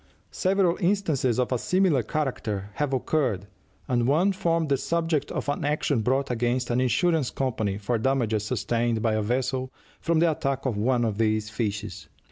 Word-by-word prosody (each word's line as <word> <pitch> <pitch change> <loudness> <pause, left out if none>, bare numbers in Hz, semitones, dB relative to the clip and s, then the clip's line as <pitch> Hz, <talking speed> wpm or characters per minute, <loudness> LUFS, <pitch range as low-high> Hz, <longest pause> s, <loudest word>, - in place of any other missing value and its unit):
Several 185 -2 +1
instances 170 - +1
of 125 - 0
a 125 - +1
similar 180 -6 +2
character 110 -6 -3
have 145 +4 -1
occurred, 130 -7 0 0.4
and 120 -1 +1
one 165 +8 +3
formed 165 -5 0
the 140 - +4
subject 165 +1 -1
of - - -3
an 145 - -1
action 150 -3 +1
brought 130 +4 0
against 120 +1 0
an 120 +1 +2
insurance 160 +2 +2
company 110 -7 -2
for 110 +3 -1
damages 115 -4 +1
sustained 120 -1 -1
by 110 -2 +2
a 110 - +1
vessel 130 +3 -1 0.3
from 165 0 +1
the 165 0 +4
attack 135 -2 -2
of 125 -5 0
one 120 +3 +1
of 110 -1 -2
these 110 -1 +1
fishes. 105 -4 -4
130 Hz, 170 wpm, -26 LUFS, 115-150 Hz, 0.4 s, the